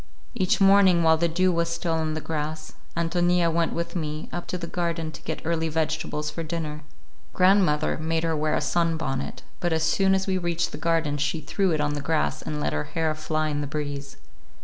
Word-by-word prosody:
Each 210 -2 +1
morning, 195 -3 +6
while 160 0 +5
the 170 +1 +2
dew 185 +3 +2
was 170 -1 0
still 170 0 -1
on 160 -1 -1
the 155 - -3
grass, 155 0 -4 0.2
Ántonia 175 0 +2
went 165 0 +1
with 170 +2 -3
me 155 -2 -3
up 175 - -4
to 180 - -2
the 170 - -5
garden 170 -2 -2
to - - -11
get 160 - -5
early 165 0 0
vegetables 155 -1 -1
for 165 - -5
dinner. 155 -2 -4 0.5
Grandmother 180 -6 +3
made 160 +1 -1
her 165 -1 +1
wear 155 0 +1
a - - 0
sunbonnet, 150 -2 -1 0.2
but 175 - 0
as 160 0 +1
soon 190 +4 +3
as 190 0 0
we 190 -1 0
reached 175 -1 -1
the - - -7
garden 160 -3 +1
she 150 +3 0
threw 185 +6 0
it 155 - +1
on 145 0 0
the 145 - -3
grass 155 +2 0
and 150 - -4
let - - -1
her 75 0 -1
hair 160 -2 -1
fly 155 0 -1
in 145 -1 -1
the 145 - -3
breeze. 145 -2 -5
160 Hz, 215 wpm, -25 LUFS, 155-170 Hz, 0.5 s, morning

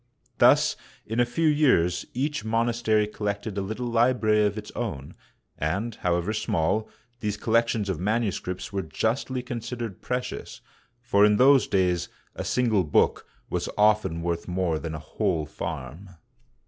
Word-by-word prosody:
Thus - - +5 0.3
in 115 +2 -3
a 120 - +4
few 160 +7 +1
years 130 - +3
each 140 -1 -1
monastery 115 -1 +1
collected 105 0 -4
a 100 - -1
little 110 +5 -4
library 115 -2 +3
of 105 +1 -4
its 105 -1 -7
own, 80 - -5 0.5
and, 95 +10 -1
however 90 +1 -1
small, 105 +1 0 0.3
these 105 -1 -2
collections 115 -1 +1
of 95 -5 -2
manuscripts 100 -2 -2
were 100 - 0
justly 120 - -2
consid 125 0 -5
ered 115 -5 -6
precious, 125 0 -4 0.4
for 100 -4 +3
in 105 0 +5
those 135 +2 +6
days 90 -3 +1 0.2
a - - -5
single 115 -6 +2
book 75 - +1 0.2
was - - -2
often 105 -6 +3
worth 85 -1 -2
more 90 -3 0
than 80 -1 -5
a - - -4
whole 80 0 -1
farm. 80 +3 -6
105 Hz, 150 wpm, -26 LUFS, 90-120 Hz, 0.5 s, those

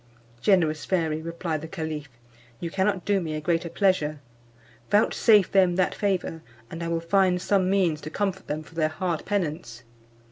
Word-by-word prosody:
"Generous 160 -6 +2
fairy," 160 -4 0
replied 165 -1 -3
the 160 - -7
caliph, 160 -4 -5 0.5
"you 170 - -4
cannot 190 -1 0
do 200 -2 +2
me 160 -2 -3
a - - -2
greater 170 +2 -1
pleasure; 165 -5 +1 0.7
vouchsafe 210 -1 +4
them 185 -3 +4
that 185 0 +1
favour, 185 -5 -1 0.3
and 165 - -6
I 170 - -2
will 165 0 0
find 180 +1 +2
some 185 0 +1
means 180 -6 +1
to 155 - -6
comfort 190 +2 -2
them 155 +1 -3
for 160 - -17
their 155 -1 +1
hard 170 0 -2
penance. 155 - -3
170 Hz, 170 wpm, -26 LUFS, 155-190 Hz, 0.7 s, vouchsafe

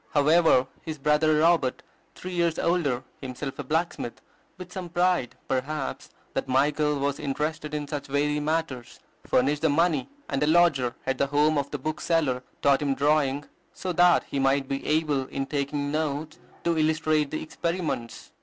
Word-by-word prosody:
However, 150 -2 +5 0.2
his 160 -2 -6
brother 150 +2 +3
Robert, 160 -6 +2 0.3
three 185 - -7
years 170 -2 +1
older, 145 -8 0 0.2
himself 135 +1 -6
a - - -2
blacksmith, 155 -4 -2 0.4
with 180 0 -10
some 185 -2 -5
pride, 175 -6 +1
perhaps, 135 +2 -3 0.2
that - - -2
Michael 150 +3 +2
was 140 0 -1
interested 150 +1 -3
in 145 -1 -3
such 145 -1 -5
weighty 145 +1 +1
matters, 150 -6 -3 0.3
furnished 145 +3 +2
the 160 - +3
money, 160 -1 +2 0.2
and 135 0 -2
a 150 - +2
lodger 155 -7 +3
at 135 -1 -1
the 140 - +2
home 150 +2 +3
of 140 -1 -1
the 145 - -3
bookseller 155 -2 0 0.2
taught 140 0 +4
him 140 -2 0
drawing, 145 0 +1 0.3
so 185 -1 -3
that 175 0 +5
he 140 - -4
might 135 0 +2
be 135 0 -3
able, 150 -4 +1
in 135 0 -3
taking 145 0 -2
notes, 155 0 -2 0.2
to 170 -1 +1
illustrate 155 -1 +2
the 155 - -4
experiments. 160 -8 -4
150 Hz, 165 wpm, -26 LUFS, 140-160 Hz, 0.4 s, However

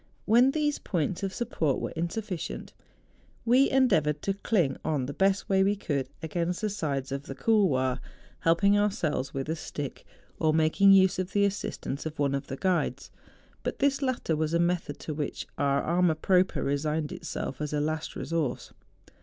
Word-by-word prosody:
When 240 +4 +5
these 295 0 0
points 175 0 -2
of 195 -1 -2
support 170 - -1
were - - -4
insufficient, 175 +2 -4 0.7
we 255 +4 +5
endeavoured 155 - +2
to 195 - 0
cling 180 - 0
on 150 -5 0
the 140 - -5
best 195 +3 +1
way 190 -1 +3
we 200 +1 +2
could 140 -9 -2
against 170 +4 -2
the 215 -1 -1
sides 140 -9 -2
THE 135 - -1
JUNGFRAU. - - -9
67 - - -16
of - - -19
the 135 - -9 0.3
couloir, 130 -1 0 0.4
helping 200 +5 +3
ourselves 165 - 0
with 135 +1 -3
a 160 - -1
stick, 145 -3 -6 0.4
or 155 -1 +2
making 160 +5 +5
use 190 -1 +5
of 185 0 -3
the 205 0 +4
assistance 190 -7 -3
of 160 +1 -8
one 140 -1 +1
of 140 0 -3
the 135 - -5
guides; 185 +1 -1 0.5
but - - -3
this 280 0 +1
latter 255 - 0
was 155 +1 0
a - - +3
method 170 -4 0
to 155 - -4
which 150 -1 -4
our 140 -1 +2
amour 175 -1 +2
propre 185 +3 +2
resigned 150 +2 -1
itself 130 - -5
as 150 - -2
a 150 - 0
last 155 +1 -2
resource. 160 -7 -3
165 Hz, 185 wpm, -28 LUFS, 145-195 Hz, 0.7 s, When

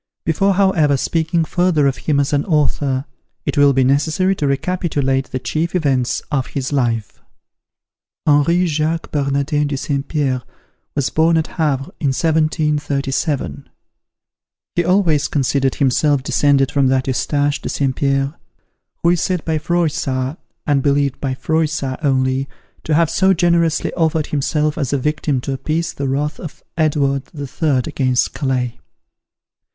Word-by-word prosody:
Before, 195 +4 +2
however, 175 -8 +3
speaking 165 +3 0
further 175 -4 +2
of 135 -2 +1
him 145 -2 +3
as 140 +1 0
an 145 0 +2
author, 145 -4 0 0.4
it - - -1
will 145 -1 +5
be 135 -1 +2
necessary 155 +8 +2
to 145 - 0
recapitulate 140 -3 0
the 130 - -3
chief 160 +7 -2
events 135 -7 0
of 135 -3 0
his 135 +1 -4
life. 115 -6 -1 1.0
HENRI 160 +4 +3
JACQUES 160 0 -1
BERNARDIN 145 +1 0
DE 140 -1 -2
ST. 140 0 -2
PIERRE, 135 -5 0 0.5
was 135 -4 0
born 165 +1 +3
at 160 - +1
Havre 145 -5 -2
in 145 - 0
1737. 150 - -1 1.0
He 175 - +1
always 170 -5 +2
considered 135 -1 0
himself 140 +1 +2
descended 140 -1 +2
from 140 -2 +2
that 130 0 +1
Eustache 145 +2 0
de - - -4
St. 135 -2 -1
Pierre, 135 0 0 0.7
who 170 - +4
is 175 - +1
said 180 -4 -1
by 160 -1 0
Froissart, 150 -4 -1 0.3
(and 145 -2 +2
I - - -2
believe 140 -1 +1
by 130 -2 -1
Froissart 155 -3 -1
only), 130 -1 +1 0.4
to 155 - +1
have 165 0 +3
so 190 0 +3
generously 170 -1 +1
offered 160 -2 +1
himself 150 +1 -1
as 140 -4 -1
a - - +2
victim 145 0 -1
to 135 - -3
appease 155 +5 -2
the 140 - -3
wrath 145 +3 -2
of 165 - -9
Edward 140 -4 +1
the 145 -5 -6
Third 135 -2 0
against 130 -5 0
Calais. 130 -4 -2
145 Hz, 150 wpm, -18 LUFS, 135-160 Hz, 1.0 s, will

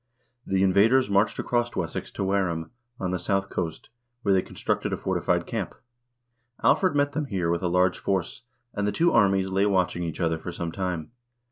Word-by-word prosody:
The 95 0 +2
invaders 100 +6 +4
marched 100 +2 +2
across 120 0 -1
Wessex 85 -3 -3
to - - -3
Wareham, 95 -4 -1 0.3
on 90 -1 -2
the 90 - -1
south 95 +1 -1
coast, 80 +4 -4 0.3
where 100 - +3
they 95 - +4
constructed - - -2
a - - -1
fortified - - 0
camp. - - -4 0.9
Alfred 185 -5 +4
met 145 0 +2
them 150 +1 -2
here 90 -9 -1
with 85 - 0
a 90 - 0
large 90 +1 +2
force, 95 +1 -2 0.3
and 100 -1 -1
the - - +1
two 170 +11 +2
armies 95 -2 +3
lay 95 +2 +2
watching 90 -3 +1
each 85 -2 -4
other 80 -2 0
for 90 - -6
some 85 -1 -4
time. 90 -3 -3
95 Hz, 190 wpm, -26 LUFS, 90-100 Hz, 0.9 s, invaders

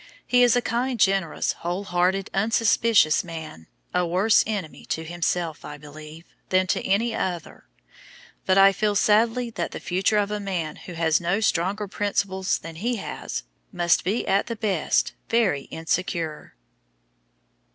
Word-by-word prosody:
He 250 0 +3
is 245 -1 +5
a 245 - +1
kind, 245 +1 -1
generous, 195 -5 +1
whole 175 +3 -4
hearted, 185 +1 0
unsuspicious 215 -4 +3
man, 160 - -9 0.3
a 180 - +2
worse 185 +6 +3
enemy 200 -8 -4
to 160 - -3
himself, 170 -1 -2
I 150 0 -8
believe, 155 +2 -12 0.2
than 185 0 +3
to - - -4
any 220 +5 +1
other; 180 -6 -4 0.8
but 190 - +4
I 195 0 +8
feel 205 +1 0
sadly 230 +4 +2
that 175 -6 -3
the - - -5
future 190 +4 0
of 205 0 +1
a 210 - -2
man 180 -6 -3
who 180 - -10
has 165 -1 +1
not 185 +6 0
stronger 200 +2 0
principles 195 -1 -1
than 165 0 -10
he 240 +7 -1
has 220 - -5 0.3
must 175 -3 +2
be 205 +6 -1
at 195 +1 +2
the 230 - -3
best 200 -7 0 0.2
very 200 -12 +1
insecure. 165 -1 -3
190 Hz, 150 wpm, -24 LUFS, 170-210 Hz, 0.8 s, I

